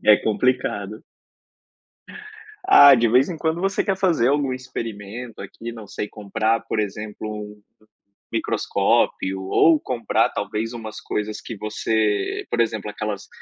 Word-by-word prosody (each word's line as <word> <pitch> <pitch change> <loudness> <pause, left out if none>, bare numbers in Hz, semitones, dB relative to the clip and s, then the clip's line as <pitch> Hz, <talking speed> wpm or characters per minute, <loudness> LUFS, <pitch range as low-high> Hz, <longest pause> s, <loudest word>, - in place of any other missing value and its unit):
É 105 -1 +8
complicado. 110 -2 -1 1.6
Ah, 145 - +9
de 120 -2 +3
vez 125 +7 +4
em 175 - -4
quando 160 +1 -1
você 195 +1 +1
quer 195 -1 0
fazer 170 -11 +2
algum 140 -2 +1
experimento 115 -2 -7
aqui, 115 +4 -7
não 110 -2 -10
sei, 105 - -5
comprar, 110 +2 -1
por 110 - -4
exemplo, 105 +1 -4
um 105 -1 -8 0.7
microscópio, 95 0 0
ou 155 +11 +4
comprar, 120 -4 0
talvez, 105 +3 -3
umas 110 -2 -7
coisas 105 0 -3
que 115 - -7
você 105 -1 -1
por 120 - 0
exemplo 110 -2 -1
aquelas 105 -1 -5
110 Hz, 135 wpm, -22 LUFS, 105-125 Hz, 1.6 s, Ah